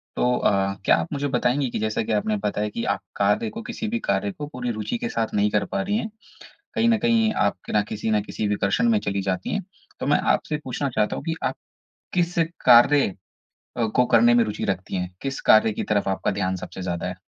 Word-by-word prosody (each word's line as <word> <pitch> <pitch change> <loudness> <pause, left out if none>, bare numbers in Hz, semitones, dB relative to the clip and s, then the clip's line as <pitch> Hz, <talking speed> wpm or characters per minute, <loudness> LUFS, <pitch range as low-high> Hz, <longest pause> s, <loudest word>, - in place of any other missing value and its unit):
तो 125 0 +2
अ, 95 -1 +1
क्या - - +6
आप 80 - -2
मुझे 145 0 -1
बताएँगी 130 0 +1
कि - - -3
जैसा 110 0 -1
कि - - -4
आपने 105 0 +1
बताया 105 +1 -2
कि 115 - -4
आप 100 -1 0 0.2
कार्य 105 - +1
को 225 +1 -7
किसी 220 - -5
भी 235 +2 -1
कार्य 100 - -1
को 145 +5 -7
पूरी 125 -4 -4
रूचि 110 +2 -3
के 120 - -3
साथ 115 -1 -1
नहीं 105 0 +2
कर 105 - +1
पा 195 - -2
रही 205 +2 0
हैं। 220 -1 -3 0.7
कहीं 230 0 +2
न 225 -1 +4
कहीं 225 -1 +2
आप 100 - +1
क - - -8
ना 105 - +3
किसी 110 +1 -3
ना 105 -1 +3
किसी 105 +1 -4
विकर्षण 105 - +1
में 220 - +4
चली 100 - -2
जाती 95 -1 -2
हैं, 200 - -1 0.4
तो - - -2
मैं 145 - +4
आपसे 150 - -1
पूछना 135 +2 -2
चाहता 105 -4 0
हूँ - - -6
कि 165 -1 -1
आप - - 0 0.6
किस 175 -1 0 0.3
कार्य 130 +4 +7 0.7
अ, 115 - +1
को 125 +3 +2
करने 120 +1 +5
में 120 -1 +5
रुचि 105 - -4
रखती 95 -1 -2
हैं? 90 0 -4
किस 135 -1 -3
कार्य 110 0 +6
की - - -3
तरफ 105 -2 0
आपका 95 - 0
ध्यान 95 -2 -1
सबसे 95 - -8
ज़्यादा 85 -1 -3
है? 90 - -3
110 Hz, 235 wpm, -24 LUFS, 100-145 Hz, 0.7 s, कार्य